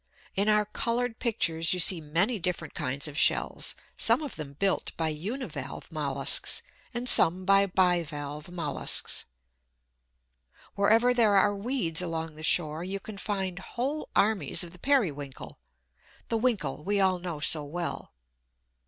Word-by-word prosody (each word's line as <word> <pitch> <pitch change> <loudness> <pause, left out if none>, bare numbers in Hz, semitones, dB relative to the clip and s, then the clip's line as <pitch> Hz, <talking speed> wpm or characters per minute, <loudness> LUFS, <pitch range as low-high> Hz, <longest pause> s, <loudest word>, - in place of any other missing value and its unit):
In 200 +2 +1
our 210 0 +3
coloured 235 +2 -2
pictures 165 -8 0
you - - -3
see 175 -1 +6
many 175 +10 0
different 170 -3 -3
kinds 140 +1 -2
of 150 +2 -3
shells, - - +2 0.2
some - - +2
of 285 - -6
them 145 -3 -7
built 195 +6 0
by 160 -1 0
uni 205 - -4
valve - - -8
molluscs - - +1 0.3
and 240 0 -4
some 185 -5 +4
by 195 +1 +5
bi 180 -2 +2
valve 150 0 -7
molluscs. 165 -5 0 1.5
Wherever 225 +5 +3
there 225 -4 +4
are 205 +1 +4
weeds 200 -6 -2
along 165 -2 -4
the 155 - -11
shore 155 0 +3
you 195 +2 -4
can 200 0 -9
find 190 -3 -3
whole 265 +9 -4
armies 210 -3 +1
of 170 - -9
the 180 - -15
Periwinkle 155 - -1 0.7
the 230 - +1
"Winkle" 195 - -1
we 205 +3 0
all 190 -2 +2
know 175 -4 -5
so 150 +1 +2
well. 170 +4 -5
185 Hz, 150 wpm, -28 LUFS, 160-215 Hz, 1.5 s, see